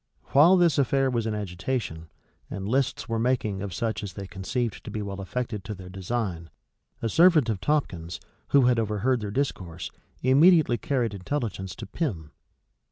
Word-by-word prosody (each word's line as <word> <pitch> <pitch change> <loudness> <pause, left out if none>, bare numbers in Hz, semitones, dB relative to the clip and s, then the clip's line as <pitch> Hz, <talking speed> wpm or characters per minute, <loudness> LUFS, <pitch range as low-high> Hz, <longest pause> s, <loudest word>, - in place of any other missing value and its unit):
While 165 +7 +6
this 170 -5 +4
affair 135 0 +2
was 115 -2 -1
in 110 - -1
agitation, 90 -3 -3 0.4
and 100 0 -5
lists 130 +2 0
were 115 -1 -1
making 115 -5 0
of 100 -1 -4
such 110 +5 -2
as 100 -4 -6
they 100 +2 -6
conceived 105 +5 -3
to - - -7
be 105 - -4
well 100 -1 -5
affected 110 0 -4
to 105 0 -5
their 90 -1 -10
design, 95 -3 -3 0.5
a - - +2
servant 160 -1 +5
of 100 -4 -2
Tomkins, 95 - -1 0.3
who 140 -3 +5
had 125 -1 +4
overheard 115 +4 +1
their 105 -2 -4
discourse, 95 - -3 0.3
immediately 140 0 +5
carried 125 -6 0
intelligence 95 -3 -3
to - - -7
Pym. 95 - -3
110 Hz, 165 wpm, -26 LUFS, 95-130 Hz, 0.5 s, While